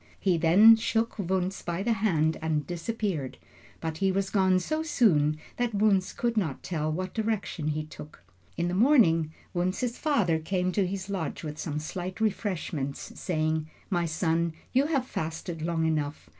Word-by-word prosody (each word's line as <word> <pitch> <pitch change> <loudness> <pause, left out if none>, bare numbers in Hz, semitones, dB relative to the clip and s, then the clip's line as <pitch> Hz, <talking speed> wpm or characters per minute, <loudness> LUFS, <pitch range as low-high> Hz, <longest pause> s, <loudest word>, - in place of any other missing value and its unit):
He 185 -3 +2
then 195 +8 +8
shook 225 +1 0
Wunzh 190 0 -1
by 175 +2 -2
the 235 +1 +2
hand 165 -7 +1
and 155 -2 0
disappeared, 175 - -3 0.4
but 160 -1 -4
he 195 -1 +2
was 195 0 -1
gone 190 -2 +4
so 310 - -2
soon 170 - +3 0.2
that 240 -3 -1
Wunzh 200 -2 +2
could 235 -1 0
not 160 -10 -1
tell 155 -3 -2
what 185 +3 -3
direction 215 -8 -2
he 155 0 -1
took. 150 - -12 0.3
In 170 - 0
the 175 - -2
morning, 185 - +4 0.2
Wunzh's 185 +8 -1
father 205 - +2
came 180 +2 -1
to 190 0 +1
his 190 0 -4
lodge 185 -7 -3
with 150 -1 -6
some 150 -3 -3
slight 180 +5 -5
refreshments, 175 -10 -2
saying: 155 -2 -1 0.2
"My 175 -2 +1
son, 165 0 0 0.2
you 270 +3 +3
have 275 -5 0
fasted 160 -4 -4
long 165 0 0
enough. 150 -2 -2
180 Hz, 165 wpm, -28 LUFS, 160-205 Hz, 0.4 s, then